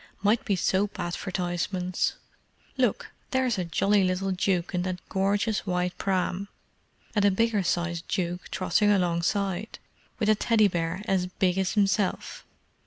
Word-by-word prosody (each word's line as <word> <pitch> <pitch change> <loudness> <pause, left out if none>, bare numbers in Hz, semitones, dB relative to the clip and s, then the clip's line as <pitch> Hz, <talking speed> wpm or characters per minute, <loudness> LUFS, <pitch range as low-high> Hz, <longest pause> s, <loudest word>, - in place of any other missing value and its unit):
"Might 210 +3 +3
be 200 - +1
soap 195 +2 0
advertisements. 180 +1 -2 0.6
Look, - - 0 0.2
there's 260 -5 +1
a 180 - -1
jolly 195 +4 +2
little 185 +1 0
duke 185 -1 0
in 180 - 0
that 185 0 -2
gorgeous 200 +2 0
white 180 0 0
pram, 190 0 -1 0.7
and 205 -3 +2
a 205 - +6
bigger 215 +1 +1
sized 175 -1 -1
duke 175 -1 -2
trotting 185 +3 +1
alongside, 190 +2 0 0.4
with 215 - 0
a 215 - +6
Teddy 215 0 +3
bear 170 +1 -2
as 185 -2 +1
big 180 0 0
as 190 -1 0
himself. 200 -1 0
190 Hz, 140 wpm, -27 LUFS, 180-205 Hz, 0.7 s, a